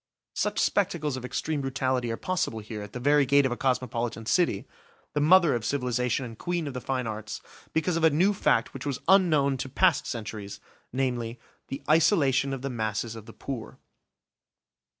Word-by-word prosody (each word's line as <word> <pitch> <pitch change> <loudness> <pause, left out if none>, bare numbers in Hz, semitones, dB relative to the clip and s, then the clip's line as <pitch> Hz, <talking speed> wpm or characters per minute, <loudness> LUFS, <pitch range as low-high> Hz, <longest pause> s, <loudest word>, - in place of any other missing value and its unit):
Such - - -1
spectacles 160 -8 +1
of 130 - -6
extreme 145 +3 -2
brutality 130 -2 -1
are 115 - -3
possible 180 -11 -1
here 110 0 -6
at 105 0 -9
the 125 - -4
very 145 +3 +4
gate 140 +1 +4
of 130 - 0
a - - 0
cosmopolitan 120 -3 -1
city, 150 - +1 0.5
the 150 - +1
mother 170 0 +6
of 120 -2 -1
civilisation 125 -1 0
and 115 -2 -8
queen 175 -2 -2
of 140 - -4
the 125 - -5
fine 130 -1 -2
arts, 110 -1 -5 0.3
because 160 +1 0
of 165 - -2
a 160 - +7
new 180 +7 +3
fact 115 - +1
which 135 +2 -6
was 140 -2 -2
unknown 155 -8 +4
to 135 +1 -4
past 130 - +2
centuries, 105 -3 -6 0.3
namely, 125 -2 -2 0.3
the 135 - -6
isolation 150 -4 +3
of 135 -1 -4
the - - -1
masses 110 -1 -2
of 110 0 -10
the 115 - -10
poor. 130 -5 -6
130 Hz, 185 wpm, -27 LUFS, 115-150 Hz, 0.5 s, a